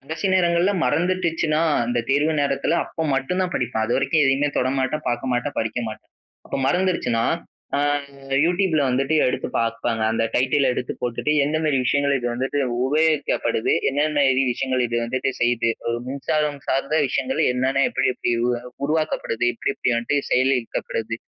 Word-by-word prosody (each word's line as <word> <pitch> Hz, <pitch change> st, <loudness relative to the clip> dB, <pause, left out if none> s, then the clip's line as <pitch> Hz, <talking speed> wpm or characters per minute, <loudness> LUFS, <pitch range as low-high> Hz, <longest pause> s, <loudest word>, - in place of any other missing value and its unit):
கடைசி 160 Hz, +8 st, -4 dB
நேரங்கள்ல 175 Hz, +1 st, +3 dB
மறந்துடுச்சுனா, 165 Hz, +1 st, +1 dB, 0.2 s
அந்த 120 Hz, 0 st, -1 dB
தேர்வு 150 Hz, +3 st, +2 dB
நேரத்துல 140 Hz, +4 st, 0 dB
அப்ப 160 Hz, -1 st, -4 dB
மட்டும் 135 Hz, +8 st, -1 dB
தான் 180 Hz, -, -3 dB
படிப்பேன். 115 Hz, -3 st, -1 dB
அது 120 Hz, -, +1 dB
வரைக்கும் 150 Hz, +3 st, +2 dB
எதையுமே 135 Hz, +2 st, +2 dB
தொட 130 Hz, -, +1 dB
மாட்டேன், 150 Hz, +4 st, -2 dB
பார்க்க 125 Hz, +1 st, -1 dB
மாட்டேன், 125 Hz, +4 st, -2 dB
படிக்க 110 Hz, +2 st, -1 dB
மாட்டேன். 110 Hz, -, -10 dB, 0.4 s
அப்ப -, -, -3 dB
மறந்துருச்சுனா, 155 Hz, -10 st, +1 dB, 0.5 s
அ -, -, +1 dB, 0.7 s
யூடியூப்ல 175 Hz, -3 st, +2 dB
வந்துட்டு 135 Hz, +4 st, +1 dB
எடுத்து 125 Hz, -, -1 dB
பார்ப்பேங்க. 115 Hz, 0 st, -1 dB
அந்த 115 Hz, 0 st, +1 dB
டைட்டில 130 Hz, +2 st, +2 dB
எடுத்து 125 Hz, -, -3 dB
போட்டுட்டு 120 Hz, +4 st, -1 dB
எந்த 150 Hz, +2 st, 0 dB
மாதிரி 150 Hz, -3 st, +1 dB
விஷயங்கள் 140 Hz, +1 st, +2 dB
இது 125 Hz, -2 st, -3 dB
வந்துட்டு 135 Hz, +3 st, -2 dB, 0.3 s
உபயோகிக்கப்படுது. 150 Hz, -6 st, +1 dB, 0.2 s
என்னென்ன 145 Hz, +1 st, +1 dB
இது 130 Hz, +1 st, +2 dB
விஷயங்கள் 130 Hz, 0 st, -1 dB
இது 120 Hz, 0 st, -3 dB
வந்துட்டு 130 Hz, +3 st, -1 dB
செய்யுது. 120 Hz, -1 st, +2 dB, 0.2 s
ஒரு 115 Hz, 0 st, 0 dB
மின்சாரம் 145 Hz, +1 st, -1 dB
சார்ந்த 140 Hz, +4 st, 0 dB
விஷயங்கள் 130 Hz, 0 st, -1 dB
என்னென்ன 130 Hz, +2 st, +1 dB
எப்படி 135 Hz, 0 st, +1 dB
எப்படி 120 Hz, -, -1 dB
உருவா 120 Hz, -1 st, 0 dB, 0.2 s
உருவாக்கப்படுது. 155 Hz, -6 st, -1 dB
எப்படி 130 Hz, -, -2 dB
எப்படி -, -, -1 dB
வந்துட்டு 120 Hz, +5 st, 0 dB
செயல்படுத்தப்படுது, 125 Hz, -3 st, 0 dB
135 Hz, 155 wpm, -22 LUFS, 120-155 Hz, 0.7 s, நேரங்கள்ல